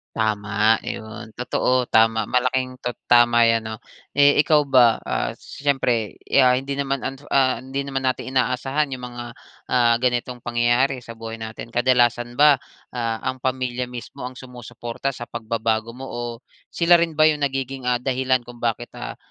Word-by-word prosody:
Tama 110 0 +2
'yon. 110 0 -7
Totoo. 125 0 0
Tama 110 -1 +3
malaking 130 0 0
to 125 - -1 0.2
tama 120 -1 +6
'yan, 115 -1 +1
'no. 110 0 -5 0.4
Eh, 145 +1 +5
ikaw 155 -1 +5
ba, 130 -5 +4
ah, 65 0 -2
siyempre, 125 -6 -2
eh, - - +2
ah, 125 - +5
hindi 135 +2 -2
naman, 135 -1 -1 0.3
ah, 130 -2 +3
hindi 135 +2 -4
naman 135 -1 -3
natin 130 0 -1
inaasahan 130 +3 0
yung 125 -1 -6
mga, 120 0 -7 0.5
ah, 120 -2 +4
ganitong, 125 0 -1
pangyayari 120 +3 +1
sa 115 -1 -11
buhay 115 0 -7
natin. 110 +1 -8
Kadalasan 120 -1 +2
ba, 145 -3 +6 0.3
ah, 115 -2 -3
ang 130 -1 -3
pamilya 125 -1 -2
mismo 125 -1 -9
ang 125 0 -6
sumusuporta 120 0 -6
sa 120 -3 -7
pagbabago 115 0 -2
mo? 135 - -7
O 120 -1 -6 0.2
sila 170 0 +3
rin 165 -2 -1
ba 155 - +6
yung 150 -1 +2
nagiging, 135 -2 -2
ah, 125 - +2
dahilan 130 0 0
kung 120 0 -12
bakit, 120 0 -2
ah, - - -7
125 Hz, 165 wpm, -22 LUFS, 115-130 Hz, 0.5 s, tama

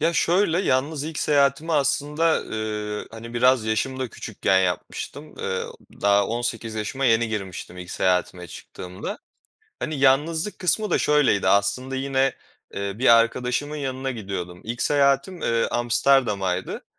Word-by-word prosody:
Ya 165 +3 +2
şöyle, 175 0 +2
yalnız 145 -2 0
ilk 160 0 -5
seyahatimi 145 +2 +2
aslında, 150 +2 +1
ııı, 105 -1 -4
hani, 115 +1 -9
biraz 125 -1 +4
yaşım 110 +4 -1
da 130 - -2
küçükken 95 -2 0
yapmıştım. 95 - -4
Iıı, 95 - -3 0.3
daha 100 0 +4
18 115 -1 -3
yaşıma 110 +6 -3
yeni 115 -2 +3
girmiştim 95 -4 -6
ilk 90 0 -8
seyahatime 90 -1 0
çıktığımda. 90 +4 -8 0.6
Hani, 155 -2 -3
yalnızlık 155 +8 +2
kısmı 210 +4 0
da - - +3
şöyleydi, 145 -9 +3
aslında 125 +7 +1
yine, 135 0 +1 0.4
ııı, 100 +1 -3
bir 130 - +3
arkadaşımın 125 +5 -1
yanına 135 -1 -3
gidiyordum. 95 -6 -5
İlk 120 +2 -3
seyahatim, 140 +5 +2
ııı, 115 0 +1
Amsterdam'aydı. 115 -7 +1
125 Hz, 135 wpm, -24 LUFS, 105-145 Hz, 0.6 s, biraz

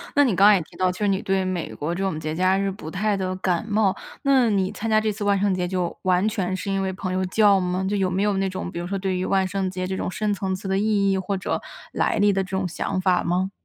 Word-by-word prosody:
那 285 - +6
你 245 - +2
刚 195 +2 +5
刚 210 0 +8
也 180 - +1
提 - - -13
到， 185 0 +2
就 180 - -5
是 210 - +1
你 195 0 +1
对 190 0 0
美 185 -3 -3
国 160 +4 -3
这 185 - -4
种 190 -5 -1
节 155 0 -4
假 185 +3 +2
日， 195 0 0
不 190 -5 -8
太 205 +4 0
的 185 -1 -2
感 185 0 -1
冒， 210 -2 +2 0.3
那 265 -4 +4
你 195 -2 +1
参 225 - -4
加 215 0 +4
这 215 -1 0
次 205 0 -5
万 200 -1 +3
圣 200 0 +1
节， 180 -1 -1
就 180 -2 -2
完 185 +1 +2
全 190 -4 -2
是 195 +1 -4
因 195 0 0
为 190 -1 -2
朋 185 -1 -4
友 185 0 0
叫 200 +1 +4
吗？ 180 +1 -1
就 205 - 0
有 190 -2 +1
没 190 +3 0
有 205 -2 +1
那 195 0 0
种， 185 -1 -5
比 170 - -5
如 175 - -4
说 195 - -2
对 190 -1 -1
于 185 - -2
万 190 0 +2
圣 190 0 -2
节 185 0 -4
这 190 +1 -3
种 - - -2
深 210 +2 -1
层 190 -1 -2
次 190 +1 -6
的 190 - +1
意 205 -2 +2
义， 190 - +1
或 195 +1 -2
者 185 - -2 0.3
来 - - 0
历 205 0 +4
的 195 - +1
这 190 0 -7
种 190 - -1
想 180 +1 -2
法 185 -1 +2
吗？ 185 +3 0
190 Hz, 325 characters per minute, -23 LUFS, 185-200 Hz, 0.3 s, 刚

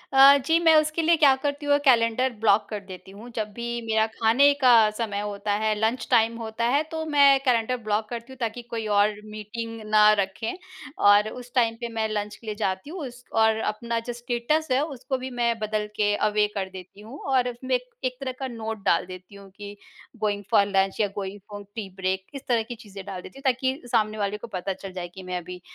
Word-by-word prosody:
अ, 275 +1 +9
जी, 325 +3 +4
मैं 325 -1 +6
उसके 310 +1 +2
लिए 335 +1 +4
क्या 285 -4 +6
करती 290 0 -2
हूँ, 285 0 +4
कैलेंडर 245 0 +3
ब्लॉक 210 -1 +3
कर 210 - -4
देती 190 0 -10
हूँ। 215 +5 -11
जब 215 -2 -3
भी 235 +1 -4
मेरा 220 -1 +2
खाने 230 +6 +4
का 250 -2 +7 0.2
समय 210 -4 -2
होता 205 0 -3
है, 215 0 +2
लंच 225 +4 0
टाइम 230 0 +4
होता 225 0 -3
है, 280 +4 +3
तो 320 0 -3
मैं 280 -1 +6
कैलेंडर 250 0 +2
ब्लॉक 215 0 -1
करती 235 +1 -7
हूँ, - - -14
ताकि 235 0 -3
कोई 230 -2 -5
और 205 +1 +3
मीटिंग 225 +2 -6
ना 215 0 +6
रखें 200 +3 -2 0.5
और 205 +1 +6
उस 245 +1 -10
टाइम 230 -2 +3
पे 235 - -3
मैं 220 -1 0
लंच 210 -1 -3
के - - -18
लिए 215 - -3
जाती 190 +3 -2
हूँ। 360 +4 -7
उस 245 0 -13
और 220 0 +4 0.2
अपना 235 +2 -3
जो - - -1
स्टेटस 240 +6 -1
है, 255 +2 +3
उसको 270 -3 -4
भी 255 +1 -6
मैं 235 -1 +1
बदल 215 0 -2
के 205 -1 +2
अवे 210 0 +2
कर 190 -2 -2
देती 190 +1 -12
हूँ 235 +7 -10
और 250 -1 +3
उसमें 255 +2 -2
एक 250 0 -4 0.2
एक 255 0 -2
तरह 270 -2 -3
का 265 - -3
नोट 225 -3 -6
डाल 170 - +3
देती 185 +2 -11
हूँ 200 -1 -13
कि 205 0 -9 0.4
गोइंग 205 -1 -1
फ़ॉर 200 - +5
लंच 195 0 +1
या 210 - +3
गोइंग 200 0 -5
फ़ॉर 205 0 -8
टी 215 -4 -5
ब्रेक, 190 0 -2
इस 275 - -8
तरह 235 -3 +2
की 240 +2 -8
चीज़ें 200 -4 -11
डाल 190 -2 -6
देती 270 - -12
हूँ, - - -16
ताकि 260 +2 -2
सामने 215 0 +1
वाले 205 0 -1
को 225 - -9
पता 190 +2 -3
चल 195 +1 -9
जाए 180 -1 -5
कि 190 - -9
मैं 180 0 -3
अभी 180 +1 -8
225 Hz, 230 wpm, -25 LUFS, 205-250 Hz, 0.5 s, अ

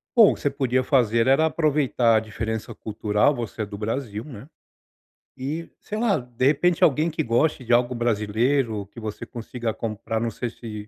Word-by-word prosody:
Bom, 225 -4 +8
o - - -7
que - - -14
você 145 - +2
podia 130 -2 0
fazer 115 -4 +3
era 135 +5 +4
aproveitar 145 -7 +2
a - - +4
diferença 110 +1 -4
cultural, 105 +5 +1
você 115 -3 -4
é - - -3
do 100 0 -9
Brasil, 110 -1 -3
né. 125 -3 -10 0.9
E 150 +6 -5
sei 215 - -6
lá, 220 -3 +2
de 125 0 -3
repente 160 +5 +3
alguém 155 +3 +4
que 160 0 -2
goste 125 +2 +1
de 120 - +1
algo 120 +1 +3
brasileiro, 115 0 0
que 115 - -9
você 110 -2 -6
consiga 115 0 -5
comprar, 110 0 -3
não 115 - -1
sei 115 +2 -4
se 105 -3 -8
120 Hz, 190 wpm, -24 LUFS, 110-140 Hz, 0.9 s, Bom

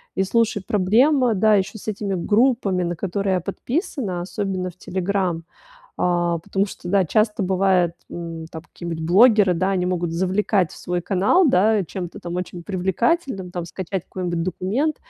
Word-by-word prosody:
И, 190 - +2
слушай, 210 0 +1
проблема, 240 +6 +3
да, 215 +2 +4
еще 195 +2 -1
с 215 - -13
этими 205 -1 -3
группами, 205 -1 +2
на 175 0 -2
которые 195 +3 -1
я 185 - +2
подписана, 215 - -3
особенно, 185 0 -3
в 175 - -16
"Телеграм", 185 -2 -2 0.6
а, 175 -1 +1
потому 195 +3 -1
что, 180 - -9
да, 195 0 +3
часто 215 +5 +1
бывает, 185 -2 +2 0.2
м, 165 -1 -6
там 160 - -8
какие-нибудь 170 -1 -7
блогеры, 205 0 +5
да, 185 +3 0
они 180 -2 0
могут 175 -2 -1
завлекать 190 +1 +1
в - - -12
свой 175 0 -3
канал, 200 - +3
да, 210 -1 +3
чем-то 175 +1 -6
там 175 0 -6
очень 180 -1 -5
привлекательным, 195 - -1
там, 175 -1 -4
скачать 190 +1 -4
какой-нибудь 175 -2 -3
документ, 200 - -1
190 Hz, 165 wpm, -22 LUFS, 175-210 Hz, 0.6 s, блогеры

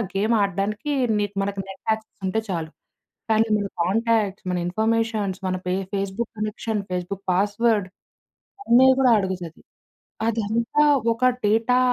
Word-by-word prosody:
Game 215 +4 +2
ఆడడానికి 200 +7 -2 0.3
నీ 205 - +1 0.2
మనకి 200 0 -3
నెట్ 195 0 -10
యాక్సెస్ 220 0 -6
ఉంటే 205 +4 0
చాలు. 165 -4 -3 0.6
కానీ 220 +1 +4
మన 205 -1 -1 0.2
కాంటాక్ట్స్, 210 +1 0
మన 180 - 0
ఇన్‌ఫర్‌మేషన్ 220 0 0
మన 185 - -1
ఫే 180 - 0 0.2
ఫేస్‌బుక్ 200 +3 -3
కనెక్షన్, 215 0 -2
ఫేస్‌బుక్ 180 +2 -4
పాస్‌వర్డ్ 205 +2 +2 0.8
అన్నీ 250 -2 +6
కూడా 255 -2 +5
అడుగుతది. 185 -4 -4 0.7
అదంతా 230 +5 0 0.3
ఒక 230 +2 -2 0.2
డేటా 225 +4 +3
210 Hz, 125 wpm, -23 LUFS, 190-225 Hz, 0.8 s, అన్నీ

